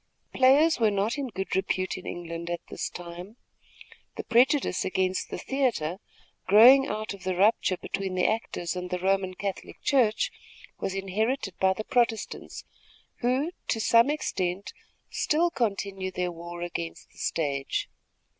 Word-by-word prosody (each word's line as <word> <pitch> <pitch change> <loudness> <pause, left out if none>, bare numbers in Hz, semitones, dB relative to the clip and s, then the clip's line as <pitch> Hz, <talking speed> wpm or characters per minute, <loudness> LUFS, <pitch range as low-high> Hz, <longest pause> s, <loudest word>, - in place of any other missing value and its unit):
Players 275 +4 +5
were 225 -2 +4
not 205 +6 0
in 275 - -2
good 195 -4 -4
repute 185 0 0
in 185 - -9
New - - -4
England 170 0 -6
at 175 0 -3
this - - -3
time. 175 +5 -9 0.8
The - - -5
prejudice 250 -2 +3
against 185 0 -1
the - - -4
theatre, 235 - -1 0.5
growing 250 +8 +8
out 215 0 -3
of 195 -3 -12
the 185 -1 -1
rupture 195 -1 +3
between 190 0 -4
the 180 - +2
actors 190 -6 -1
and 180 0 -4
the 180 - -1
Roman 190 0 0
Catholic 195 0 -5
Church, 240 -6 +2 0.5
was 195 - -3
inherited 195 +3 -1
by 190 0 +4
the 215 - -5
Protestants, 235 -2 -1 0.6
who, 260 +6 +1 0.2
to 225 - 0
some 230 +3 +5
extent, 190 -10 -2 0.4
still 335 +3 +1
continue 200 - -2
their 180 -1 -2
war 170 +1 -7
against 170 -1 -6
the - - -18
stage. 140 -4 -1
195 Hz, 150 wpm, -27 LUFS, 180-235 Hz, 0.8 s, growing